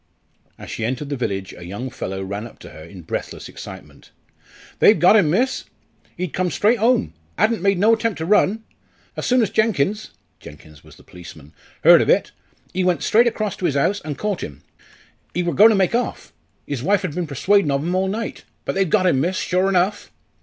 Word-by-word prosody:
As - - -10
she 115 - -5
entered 130 +5 -3
the 145 - -2
village, 95 -7 -4
a 85 - -11
young 105 +9 -6
fellow 95 -3 -5
ran 100 +4 -5
up - - -17
to - - -11
her 80 - -12
in 85 +2 -12
breathless - - -5
excitement. - - -12 0.7
"They've 210 - +6
got 180 +5 +5
'im, 190 -8 +4
miss. 245 - 0 0.5
He'd 180 -4 -4
come 185 -1 0
straight 215 - +2
home 225 - +2 0.2
'adn't 220 -4 +1
made 195 0 +2
no 215 +5 +4
attempt 225 -2 -1
to 160 - -4
run. 210 +3 +2 0.5
As - - -4
soon 250 -1 +3
as 205 - -2
Jenkins" 215 -2 0 0.3
(Jenkins 75 0 -14
was - - -16
the - - -19
policeman) 80 -4 -13 0.3
"heared - - +8
of - - -1
it, - - +2 0.4
ee 185 - +1
went 180 -5 +1
straight 235 +3 +4
across 215 -3 -2
to 180 - -1
'is 145 - -2
house, 195 +9 +1
an' 150 -2 -5
caught 210 0 -3
'im. 70 0 -9 0.7
Ee 180 - +1
wor 175 -1 -1
goin' 210 +10 +7
to 220 - +3
make 190 0 +1
off 245 +1 -3 0.3
'is 140 -4 -4
wife 200 +6 +1
'ad 160 - -4
been 175 0 -3
persuadin' 185 +6 +2
ov 140 0 0
'im 175 +2 -2
all 190 +1 +1
night. 220 +4 -4 0.2
But - - -2
they've 195 -2 0
got 190 0 +2
him, 135 -7 +3
miss, 185 +5 -1
sure 185 +1 0
enough!" 190 +2 0
180 Hz, 210 wpm, -21 LUFS, 130-210 Hz, 0.7 s, heared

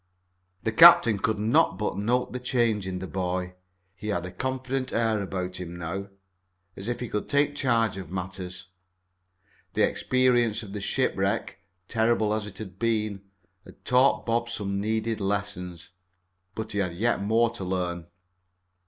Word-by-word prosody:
The 110 - 0
captain 115 - +8
could 110 +2 0
not 115 +11 +3
but 105 - -2
note 120 +6 0
the 125 - -3
change 115 -5 +1
in 95 -1 -3
the 95 - -5
boy. 90 -1 -3 0.4
He 100 +2 -9
had 90 -5 -1
a 90 - -6
confident 130 +2 -3
air 110 -2 +1
about 95 -1 -4
him 90 -1 -6
now, 85 +4 -4 0.7
as 95 - -7
if 120 0 -2
he 125 - -3
could 105 -1 -3
take 145 0 +3
charge 115 -7 +1
of 95 -4 -7
matters. 90 -1 -6 1.1
The - - +4
experience 120 -3 +2
of 100 -2 -9
the 105 - -4
shipwreck, - - -1 0.3
terrible 110 -2 +2
as 105 -1 -2
it 100 -2 -10
had 95 -3 -9
been, 110 -4 0 0.4
had - - -17
taught 130 +2 +3
Bob 120 0 0
some 100 -3 -2
needed 110 +1 -1
lessons. 95 -4 -3 0.6
But 110 0 -4
he 100 - -1
had 90 -3 -1
yet 115 +5 +1
more 115 +3 +2
to 115 -4 -6
learn. 90 -2 -2
105 Hz, 160 wpm, -27 LUFS, 95-115 Hz, 1.1 s, captain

